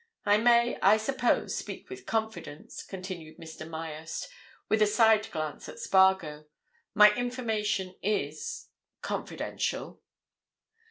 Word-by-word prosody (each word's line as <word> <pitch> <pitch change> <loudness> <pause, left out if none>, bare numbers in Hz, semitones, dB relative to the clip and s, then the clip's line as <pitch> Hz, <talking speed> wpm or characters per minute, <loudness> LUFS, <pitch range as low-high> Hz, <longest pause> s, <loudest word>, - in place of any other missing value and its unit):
I 205 0 +5
may, 235 +1 +4
I 205 +3 +6
suppose, 245 +2 0
speak - - -6
with 385 0 -10
confidence," 220 -9 -4
continued 185 -5 -8
Mr. 160 -1 -9
Myerst, 160 +2 -6 0.4
with 220 0 +2
a 210 - +6
side 220 0 +4
glance 155 -1 -5
at - - -10
Spargo. 190 -6 +3 0.5
"My 210 -1 +8
information 220 -6 -2
is—confidential." 155 -7 -4
205 Hz, 105 wpm, -29 LUFS, 160-220 Hz, 0.5 s, My